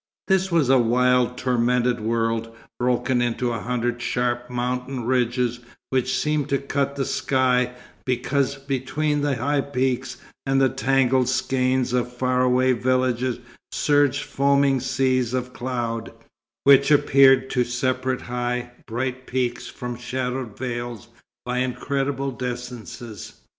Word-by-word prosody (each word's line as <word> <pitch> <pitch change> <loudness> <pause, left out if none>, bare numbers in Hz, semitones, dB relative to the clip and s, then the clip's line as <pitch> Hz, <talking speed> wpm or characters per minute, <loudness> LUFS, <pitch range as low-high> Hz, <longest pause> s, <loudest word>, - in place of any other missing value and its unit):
This 190 -1 +2
was 165 -6 +3
a 135 -1 +6
wild, 125 +1 +2
tormented 125 -1 +1
world, 115 0 -1 0.2
broken 125 0 +1
into 120 0 0
a 115 - -3
hundred 120 +1 -2
sharp 120 0 -1
mountain 125 0 -3
ridges 125 -1 +1 0.3
which 130 0 +1
seemed 150 -2 0
to 140 - +2
cut 140 0 -2
the 135 -1 -1
sky, 125 -2 +1 0.3
because 135 +2 0
between 140 +2 -1
the 145 -2 +1
high 140 +4 0
peaks 130 -2 -2 0.3
and 135 0 +1
the 135 -1 +4
tangled 130 0 +2
skein 130 0 +1
of 125 -1 0
far 125 +1 0
away 130 0 +3
villages 125 0 0 0.3
surged 145 -1 +2
foaming 140 -1 +2
seas 130 -1 0
of 125 0 -3
cloud, 120 -2 -3 0.5
which 140 0 +6
appeared 135 -2 +5
to 125 - +2
separate 130 +1 -1
high, 125 0 -3 0.2
bright 130 +2 -3
peaks 125 -1 -2
from 125 0 -6
shadowed 125 -1 -4
vales, 120 -2 -5 0.4
by 125 0 -1
incredible 135 +1 -1
distances. 120 -3 -7
125 Hz, 125 wpm, -23 LUFS, 120-135 Hz, 0.5 s, a